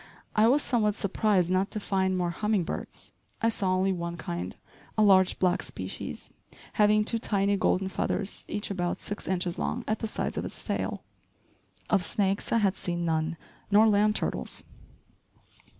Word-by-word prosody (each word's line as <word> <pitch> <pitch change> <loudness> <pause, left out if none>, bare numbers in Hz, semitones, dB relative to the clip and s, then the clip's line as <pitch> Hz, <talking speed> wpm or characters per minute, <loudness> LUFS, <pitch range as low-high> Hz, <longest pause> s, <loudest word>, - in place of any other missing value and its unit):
I 215 +1 +5
was 280 +5 +4
somewhat 215 -5 +1
surprised 200 -3 +1
not 185 +2 +2
to 215 - -3
find 190 -2 0
more 175 -1 0
humming 210 +1 0
birds. - - -6 0.3
I 230 - +2
saw 190 -4 0
only 190 +1 +2
one 170 -1 -3
kind, 90 - -5 0.4
a 215 - +5
large, 190 -2 +5
black 180 0 +2
species, - - -6 0.4
having 210 0 +4
two 230 +1 0
tiny 200 -2 +1
golden 190 0 +1
feathers 195 +1 -2
each 205 - -3
about 175 -2 -1
six 205 - -6
inches 180 -2 -1
long 240 - -2
at 215 - 0
the 225 - -2
sides - - -2
of - - -4
its - - -7
tail. - - -2 0.8
Of 190 - +2
snakes, 195 +1 0
I - - +4
had 200 -3 +2
seen 175 -1 -2
none, 160 0 0 0.3
nor 210 +2 +6
land 210 0 +3
turtles. - - -1
195 Hz, 165 wpm, -28 LUFS, 180-210 Hz, 0.8 s, nor